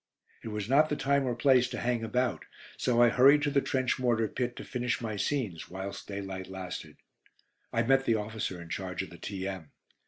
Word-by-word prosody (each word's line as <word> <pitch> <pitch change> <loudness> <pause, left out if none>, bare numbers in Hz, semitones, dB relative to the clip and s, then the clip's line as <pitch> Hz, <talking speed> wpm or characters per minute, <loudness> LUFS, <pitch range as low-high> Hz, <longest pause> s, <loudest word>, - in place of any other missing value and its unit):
It - - -8
was 105 -2 -3
not 150 +5 +4
the 150 - 0
time 140 -1 +1
or 120 - 0
place 125 0 +4
to - - -5
hang 120 -1 0
about, 125 +3 -1 0.3
so 120 -1 +1
I 120 - +7
hurried 140 +5 +6
to 145 - +1
the 140 -1 +3
trench 130 -1 0
mortar 120 -3 +2
pit 125 +3 -3
to - - -7
finish 125 -1 -2
my 110 -3 -3
scenes 105 - -2
whilst 95 +2 -6
daylight 95 -2 -5
lasted. 95 -1 -7 0.7
I 115 - +1
met 135 +2 +3
the 115 - +3
officer 105 -4 -3
in 85 -1 -10
charge 95 0 -3
of 95 - -10
the 85 - -12
T.M. 95 -5 -5
115 Hz, 205 wpm, -30 LUFS, 95-130 Hz, 0.7 s, I